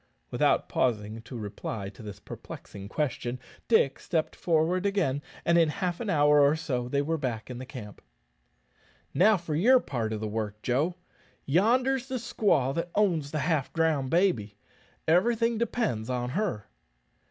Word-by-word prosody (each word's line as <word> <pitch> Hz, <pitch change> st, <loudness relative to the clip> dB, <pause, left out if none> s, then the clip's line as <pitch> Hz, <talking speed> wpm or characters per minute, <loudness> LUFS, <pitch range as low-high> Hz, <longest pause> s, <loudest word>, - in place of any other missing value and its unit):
Without -, -, +2 dB
pausing 110 Hz, -3 st, -1 dB
to 120 Hz, +2 st, -9 dB
reply 105 Hz, -1 st, -5 dB
to 100 Hz, -, -14 dB
this 105 Hz, -2 st, -8 dB
perplexing 100 Hz, 0 st, -9 dB
question, 130 Hz, -4 st, -2 dB, 0.3 s
Dick 140 Hz, -, +3 dB
stepped 160 Hz, -3 st, -2 dB
forward 170 Hz, +2 st, +1 dB
again, 195 Hz, -9 st, 0 dB, 0.2 s
and 170 Hz, 0 st, +4 dB
in 165 Hz, -2 st, +4 dB
half 180 Hz, +1 st, -2 dB
an 230 Hz, -, -3 dB
hour 150 Hz, -3 st, +5 dB
or 140 Hz, +2 st, +5 dB
so 125 Hz, -6 st, -3 dB
they 140 Hz, +2 st, +1 dB
were 160 Hz, +2 st, -1 dB
back 125 Hz, -3 st, -3 dB
in 125 Hz, -, -6 dB
the 130 Hz, -, -8 dB
camp. 110 Hz, -6 st, -9 dB, 1.1 s
"Now 205 Hz, +8 st, +5 dB
for 170 Hz, -3 st, -5 dB
your 240 Hz, -, +5 dB
part 115 Hz, -, -3 dB
of 110 Hz, -, -2 dB
the 110 Hz, -, -3 dB
work, 105 Hz, -1 st, -3 dB
Joe. 145 Hz, +8 st, +1 dB, 0.5 s
Yonder's 245 Hz, -, +2 dB
the 260 Hz, -, -4 dB
squaw 205 Hz, -, +1 dB
that 170 Hz, +3 st, -2 dB
owns 175 Hz, -9 st, +2 dB
the 155 Hz, -, -3 dB
half 150 Hz, -2 st, 0 dB
drowned 160 Hz, -5 st, +1 dB
baby. 135 Hz, -, +1 dB, 0.5 s
Everything 230 Hz, +7 st, +3 dB
depends 215 Hz, -, -1 dB
on 125 Hz, -1 st, -2 dB
her." 165 Hz, -, -2 dB
150 Hz, 160 wpm, -28 LUFS, 120-185 Hz, 1.1 s, hour